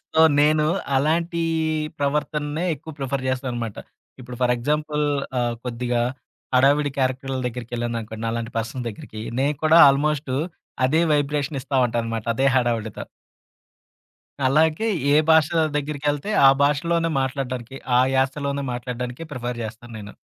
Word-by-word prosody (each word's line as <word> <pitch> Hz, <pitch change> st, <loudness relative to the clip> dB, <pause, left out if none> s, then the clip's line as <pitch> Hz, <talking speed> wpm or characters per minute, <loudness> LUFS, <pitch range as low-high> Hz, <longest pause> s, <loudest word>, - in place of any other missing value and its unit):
So, 160 Hz, -, +3 dB, 0.2 s
నేను 150 Hz, +1 st, +4 dB, 0.3 s
అలాంటి 165 Hz, +4 st, +1 dB, 0.6 s
ప్రవర్తననే 150 Hz, +2 st, -1 dB
ఎక్కువ 160 Hz, +2 st, -10 dB
ప్రిఫర్ 135 Hz, -1 st, -2 dB
జేస్తానన్నమాట. 125 Hz, -4 st, -3 dB, 0.4 s
ఇప్పుడు 125 Hz, 0 st, -9 dB
ఫర్ 125 Hz, -1 st, +3 dB
ఎగ్జాంపుల్ 150 Hz, +4 st, -1 dB, 0.3 s
ఆహ్, 120 Hz, -1 st, 0 dB
కొద్దిగా 120 Hz, 0 st, -1 dB, 0.5 s
హడావుడి 145 Hz, +3 st, +4 dB
క్యారెక్టర్‌ల 130 Hz, 0 st, -1 dB
దగ్గరికెళ్ళాననుకోండి, 115 Hz, -2 st, -4 dB
నాలాంటి 115 Hz, +1 st, -3 dB
పర్సన్ 115 Hz, +2 st, -4 dB
దగ్గరికి 110 Hz, 0 st, -8 dB, 0.2 s
నేను 145 Hz, +2 st, +1 dB
కూడా 160 Hz, +2 st, +6 dB
ఆల్మోస్టు 145 Hz, -1 st, 0 dB, 0.5 s
అదే 155 Hz, +5 st, +3 dB
వైబ్రేషన్ 145 Hz, 0 st, -1 dB
ఇస్తా 135 Hz, -, -2 dB
ఉంటానన్నమాట 115 Hz, -1 st, -3 dB
అదే 135 Hz, +2 st, +1 dB
హడావుడితో. 115 Hz, -4 st, -1 dB, 1.4 s
అలాగే 160 Hz, +9 st, +2 dB, 0.3 s
ఏ -, -, +6 dB
భాష 160 Hz, -1 st, +5 dB, 0.3 s
దగ్గరికెళ్తే 145 Hz, +3 st, -2 dB, 0.2 s
ఆ -, -, +10 dB
భాషలోనే 165 Hz, +4 st, +1 dB
మాట్లాడడానికి, 130 Hz, -1 st, -3 dB, 0.2 s
ఆ -, -, +6 dB, 0.2 s
యాసలోనే 140 Hz, +1 st, 0 dB
మాట్లాడడానికే 125 Hz, +4 st, -5 dB
ప్రిఫర్ 120 Hz, -2 st, -4 dB
జేస్తాను 115 Hz, +2 st, -8 dB
నేను. 105 Hz, 0 st, -10 dB
135 Hz, 120 wpm, -23 LUFS, 120-150 Hz, 1.4 s, ఆ